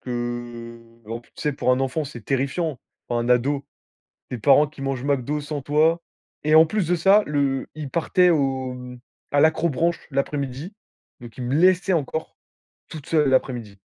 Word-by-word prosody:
que, 120 -1 -5 0.3
en 115 +1 -4
plus, 120 - -27
tu - - -13
sais, 150 - 0
pour 135 - 0
un 130 - +1
enfant, 135 +3 -1
c'est 120 -5 -9
terrifiant. 140 +2 -1 0.3
Pour 120 - -1
un 120 +1 -2
ado, 135 +3 +2 0.7
des 125 - -4
parents 145 +5 +5
qui 150 -1 -11
mangent 135 -2 -3
McDo 140 +1 0
sans 145 0 -5
toi 155 +4 +2 0.4
et 155 - +3
en 160 +1 +9
plus 200 +2 -1
de 180 - +2
ça 195 +5 +5
le 140 -2 0
ils 150 -3 -6
partaient 180 +3 +3
au 135 -5 0
mmh, 125 0 -10 0.3
à 145 - +4
l'accrobranche 165 +1 +1
l'après-midi, 140 +4 -3 0.5
donc 120 -1 -12
ils 125 - -6
me 125 - -1
laissaient 185 +3 +4
encore 160 0 -2 0.5
tout 155 - -8
seul 150 -2 +2
l'après-midi. 120 -6 -1
140 Hz, 175 wpm, -23 LUFS, 125-155 Hz, 0.7 s, en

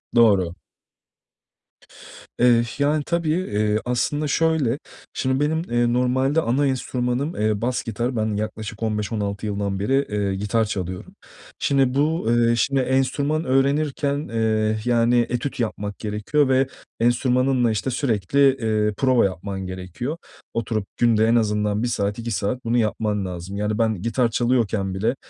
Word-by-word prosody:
Doğru. 100 -7 +4 1.8
Eh, 120 -1 +5
yani 145 +1 +2
tabii, 170 -1 -1
eee, 105 - 0
aslında 145 +5 0
şöyle, 150 -4 +1 0.3
şimdi 130 0 0
benim, 155 +2 +1
eee, 120 0 +2
normalde 130 +5 +2
ana 140 +2 +1
enstrümanım, 130 +3 -1
eee, 105 -1 +1
bas 125 +2 -1
gitar. 120 +3 -3
Ben 110 -1 0
yaklaşık 110 +1 -5
15-16 105 -1 -2
yıldan 100 -1 -2
beri, 135 +7 +1
eee, 100 -2 -1
gitar 105 +3 0
çalıyorum. 95 -3 -5 0.4
Şimdi 135 -2 +2
bu, 150 +1 +1
eee, 120 0 +3
şimdi 135 +2 +1
enstrüman 140 +4 0
öğrenirken, 140 +2 +1
eee, 110 -1 0
yani, 120 0 +3
etüt 125 +2 -3
yapmak 105 -3 -3
gerekiyor 110 +7 0
ve 130 0 +3 0.3
enstrümanınla, 125 +1 +2
işte, 110 +5 -2
sürekli, 120 -2 0 0.2
eee, 110 -2 0
prova 130 -4 +3
yapman 95 +1 -4
gerekiyor. 95 - -5 0.4
Oturup 110 -2 -2
günde 115 -2 +3
en 115 - +3
azından 105 -1 +1
1 120 - +1
saat, 105 -2 -1
2 115 0 -4
saat 115 +5 -2
bunu 115 +1 +1
yapman 105 -3 0
lazım; 90 +2 -6
yani 105 +1 -1
ben 110 -5 0
gitar 115 +1 +1
çalıyorken 110 -5 0
bile, 110 +7 0
115 Hz, 140 wpm, -22 LUFS, 105-130 Hz, 1.8 s, Eh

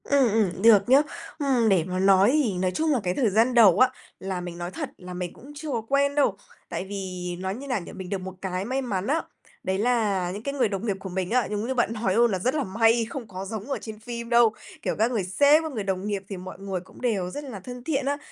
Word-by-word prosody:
Ừm, 275 -4 +3
ừm, 200 -4 +1
được 225 0 +6
nhá. 270 +3 +7 0.4
Ừm, 260 -6 +2
để 185 -5 +4
mà 185 +2 -3
nói 195 +2 +5
thì 285 -9 +2
nói 185 0 0
chung 315 - 0
là 270 - +2
cái 180 -1 0
thời 235 +1 +2
gian 225 +5 +3
đầu 210 -6 +6
á, 255 - +6 0.3
là 190 -1 -4
mình 175 -1 -7
nói 175 +1 -5
thật - - -5
là 180 0 -9
mình 180 -1 -4
cũng 275 +4 -13
chưa 305 +1 -6
có 235 -3 -1
quen 280 +5 +1
đâu, 290 - +3 0.3
tại - - -4
vì 185 -3 -5
nói 190 +1 -3
như 275 +4 -8
nào 250 -5 0
nhỉ, - - -9
mình 185 -1 -7
được 200 - -1
một 190 0 -6
cái 185 0 -3
may 260 +4 -1
mắn 205 -7 -2
á, 310 +5 +2 0.4
đấy 190 0 0
là 205 -5 +1
những 205 +4 -6
cái 280 - -3
người 255 -6 +1
đồng 200 +2 -3
nghiệp 200 -4 0
của 190 - -7
mình 185 0 -2
á, 250 0 +2
giống 210 +2 -2
như 260 - 0
bạn 240 -3 +1
nói 215 -4 0
luôn 235 0 +4
là 190 - -1
rất 250 +8 0
là 295 - +1
may, 225 +4 +3
không 245 -3 -6
có 190 -1 -6
giống 215 +1 -5
ở - - 0
trên 215 -1 -8
phim 235 +1 -6
đâu, 235 -2 +5 0.3
kiểu, - - -1
các 225 +3 +3
người 220 -6 0
sếp, 285 - +4
các 315 - -4
người 220 -6 -3
đồng 190 0 -2
nghiệp 200 -2 -2
thì 195 - -5
mọi 185 +1 -9
người 195 -2 -3
cũng 180 - -16
đều 205 -8 0
rất 290 +10 -6
là 250 -8 -7
thân 245 +5 -9
thiện 275 -1 -1
á, 285 +1 0
215 Hz, 280 wpm, -25 LUFS, 190-250 Hz, 0.4 s, nhá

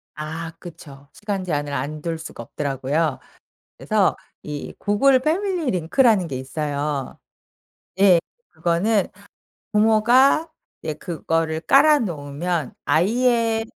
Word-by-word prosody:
아 160 +2 -5
그쵸. 145 -5 -12
시간 205 -3 -4
제한을 145 -4 -2
안 145 +3 -4
둘 165 0 -3
수가 160 -7 -8
없더라고요. 140 +3 -2 0.6
그래서 - - +1 0.3
이 150 -1 -6
구글 260 +6 +3
패밀리 340 +1 0
링크라는 185 +2 +2
게 130 -3 -4
있어요. 145 0 -3 0.8
예. 190 -3 +6 0.3
그거는 190 +4 +1 0.6
부모가 235 +9 +4 0.3
예 155 - -2
그거를 165 -1 -2
깔아 295 - +5
놓으면 160 - -3
아이의 225 +4 +2
170 Hz, 230 characters per minute, -22 LUFS, 150-225 Hz, 0.8 s, 예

